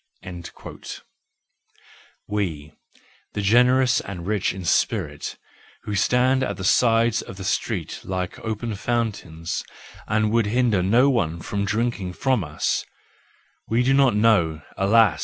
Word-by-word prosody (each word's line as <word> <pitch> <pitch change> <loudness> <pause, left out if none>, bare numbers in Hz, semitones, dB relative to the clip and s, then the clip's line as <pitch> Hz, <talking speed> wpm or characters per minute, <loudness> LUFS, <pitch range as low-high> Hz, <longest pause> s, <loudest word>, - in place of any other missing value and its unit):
—We, 85 -8 -3 0.6
the 105 - -2
generous 125 +4 +4
and 90 -3 -7
rich 105 -1 0
in 95 -1 -7
spirit, 75 -2 0 0.5
who 105 - -4
stand 125 +6 +3
at 130 - -2
the 95 - -6
sides 115 +3 +3
of 95 - -10
the 95 - -7
streets - - -2
like 90 -1 -4
open 110 +1 -3
fountains 100 -8 -3 0.4
and 110 0 +1
would 115 -2 +2
hinder 115 -3 +2
no 120 +9 +4
one 85 -10 0
from 100 +5 -3
drinking 105 -3 -1
from 130 -1 +1
us: 75 -1 -1 0.8
we 115 +2 +2
do 135 +2 +3
not 135 -5 +4
know, 90 -9 +3
alas! 100 -5 +4
105 Hz, 125 wpm, -23 LUFS, 95-120 Hz, 0.8 s, generous